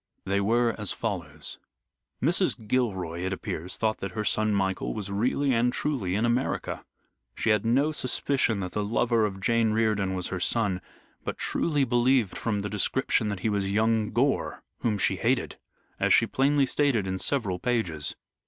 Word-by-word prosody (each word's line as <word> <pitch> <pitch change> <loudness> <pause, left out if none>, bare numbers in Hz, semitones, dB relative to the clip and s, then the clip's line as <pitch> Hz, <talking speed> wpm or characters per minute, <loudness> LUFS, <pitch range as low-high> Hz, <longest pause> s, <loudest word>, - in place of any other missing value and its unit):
They 100 +1 +1
were 115 +3 +2
as 105 -3 0
follows: - - -5 0.6
Mrs. 160 - +2
Gilroy, 95 -9 -1
it 95 +2 -2
appears, 90 -2 -4
thought 110 -1 0
that 95 -2 -5
her 110 - -2
son, 110 0 +2
Michael, 95 -2 -1
was 100 -2 -3
really 130 +6 +1
and 120 +1 +2
truly 125 -11 -1
in 110 +3 +1
America. 120 +3 -1 0.5
She 110 - +1
had 105 +1 +2
no 140 +6 +3
suspicion 130 -5 +1
that 90 -1 -4
the 105 - -1
lover 115 +1 +2
of 95 -1 -7
Jane 115 +2 +2
Riordan 105 -4 +1
was 90 -1 -2
her 95 - -3
son, 95 -1 0 0.4
but - - -4
truly 150 -4 0
believed 120 -3 +2
from 105 -3 -1
the 100 - -3
description 105 +1 +1
that 100 -2 -4
he 110 - +1
was 100 -2 0
young 110 +1 +2
Gore 135 +3 0 0.2
whom 110 -3 0
she - - +1
hated - - 0 0.4
as - - +2
she - - +6
plainly 140 +1 +2
stated 130 -6 +1
in 95 0 -3
several 105 -10 0
pages. 90 -12 -1
110 Hz, 170 wpm, -27 LUFS, 100-125 Hz, 0.6 s, she